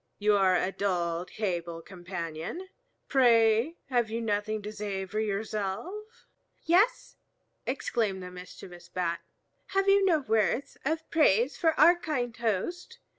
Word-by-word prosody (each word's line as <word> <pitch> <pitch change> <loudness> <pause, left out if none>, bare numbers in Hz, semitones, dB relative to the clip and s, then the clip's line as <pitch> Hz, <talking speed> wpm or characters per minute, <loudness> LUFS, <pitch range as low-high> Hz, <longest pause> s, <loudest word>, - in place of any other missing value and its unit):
You 210 0 +3
are 190 -2 +4
a 185 - +1
dull 175 -3 -1
table 170 -5 -3
companion. 175 - -6 0.4
Pray, 235 +2 +4
have 240 -4 +1
you 225 +1 -2
nothing 215 -1 -1
to 210 - -5
say 205 -2 -4
for 210 +3 -4
yourself?" 220 - -4 0.4
"Yes," 385 +9 +2 0.5
exclaimed 220 -7 -1
the 180 - -8
mischievous 180 -1 -11
Bat, 175 -1 -2 0.6
"have 390 0 +2
you 395 0 +5
no 360 -4 +4
words 225 +1 0
of 320 +2 -1
praise 275 -4 +3
for 325 -2 +1
our 345 - +8
kind 260 -9 -3
host? 250 - -2
215 Hz, 130 wpm, -29 LUFS, 185-295 Hz, 0.6 s, our